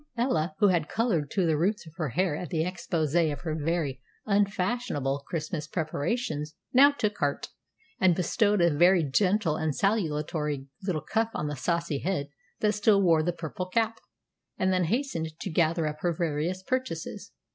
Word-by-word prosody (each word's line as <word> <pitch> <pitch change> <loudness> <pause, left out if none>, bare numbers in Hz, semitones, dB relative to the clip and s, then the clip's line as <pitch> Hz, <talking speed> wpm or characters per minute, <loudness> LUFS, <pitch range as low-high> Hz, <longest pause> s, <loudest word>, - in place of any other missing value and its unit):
Ella, 165 -10 0
who 205 - +5
had 170 -4 +1
colored 195 - 0
to 190 -3 +1
the 160 -2 +2
roots 185 +6 0
of 160 - -13
her 155 -5 -1
hair 175 +4 0
at 170 +1 -5
the 160 -2 0
exposé 165 -3 0
of 145 - -6
her 160 -3 -3
very 155 -4 -1 0.2
unfashionable 200 - 0
Christmas 155 -2 -3
preparations, 155 -1 -2 0.2
now 275 +3 +8
took 210 -7 -2
heart, 145 -1 -1 0.5
and 185 -2 +4
bestowed 205 +3 +2
a 170 -3 +3
very 175 +2 +5
gentle 180 +3 +2
and 160 -3 -1
salutary 150 -8 -1 0.2
little 185 -6 -2
cuff 225 0 0
on - - -2
the 150 0 -3
saucy 170 +1 -1
head 155 -5 -2 0.3
that 210 -1 +3
still 210 -1 +4
wore 165 -3 +4
the 175 +3 0
purple 175 +2 -5
cap, 225 +3 0 0.6
and 190 0 +1
then 180 -1 +2
hastened 165 - -2
to 190 - -4
gather 165 0 +2
up 150 0 -3
her 175 +1 0
various 170 +2 -1
purchases. 255 -9 -3
170 Hz, 170 wpm, -28 LUFS, 155-200 Hz, 0.6 s, now